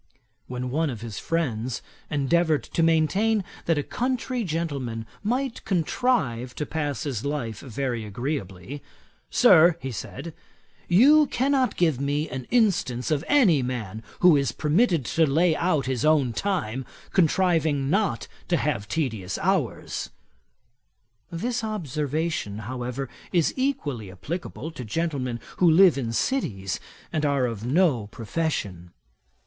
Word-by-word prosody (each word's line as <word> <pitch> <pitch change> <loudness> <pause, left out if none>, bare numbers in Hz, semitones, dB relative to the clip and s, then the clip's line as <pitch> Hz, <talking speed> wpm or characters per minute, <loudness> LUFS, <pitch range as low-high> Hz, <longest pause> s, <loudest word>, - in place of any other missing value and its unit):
When 125 0 -4
one 155 +3 +1
of 115 -5 -6
his 115 -3 -6
friends 125 -8 -2 0.3
endeavoured 155 +2 +2
to - - -2
maintain 190 +7 +3 0.2
that 165 -2 +3
a 145 - 0
country 250 - -2
gentleman 140 - -3 0.2
might 250 +3 -1
contrive 155 - 0
to 150 - -3
pass 145 -3 -2
his 130 -7 -3
life 140 -7 -3
very 125 -2 -3
agreeably, 115 - -5 0.5
'Sir 175 -8 +6
(said 160 +7 -7 0.6
he,) 175 - +2
you 300 +3 +7
cannot 265 0 +1
give 160 -7 +2
me 145 +2 0
an 130 -1 -6
instance 195 - +1
of 150 0 +1
any 220 - +5
man 115 -4 -4 0.2
who 180 -3 +7
is 140 -4 +1
permitted 160 - +2
to 160 +6 +2
lay 160 +3 +3
out 155 -6 +1
his 130 -2 -1
own 150 -6 +3
time, 135 - -1 0.3
contriving 160 -5 +2
not 185 - 0 0.2
to - - +2
have 100 +2 -1
tedious 110 - -2
hours.' 175 - -1 1.2
This 230 +8 -2
observation, 155 - -2
however, 125 +2 -4 0.2
is 170 -4 +2
equally 145 - -2
applicable 160 - -6
to 140 -6 -7
gentlemen 130 -2 -2 0.2
who 180 - +5
live 180 +2 +7
in 125 -4 -2
cities, 105 - -1 0.3
and 155 - 0
are 140 -3 +2
of 115 -3 -4
no 130 - +2
profession. 105 - -3
150 Hz, 130 wpm, -25 LUFS, 125-175 Hz, 1.2 s, you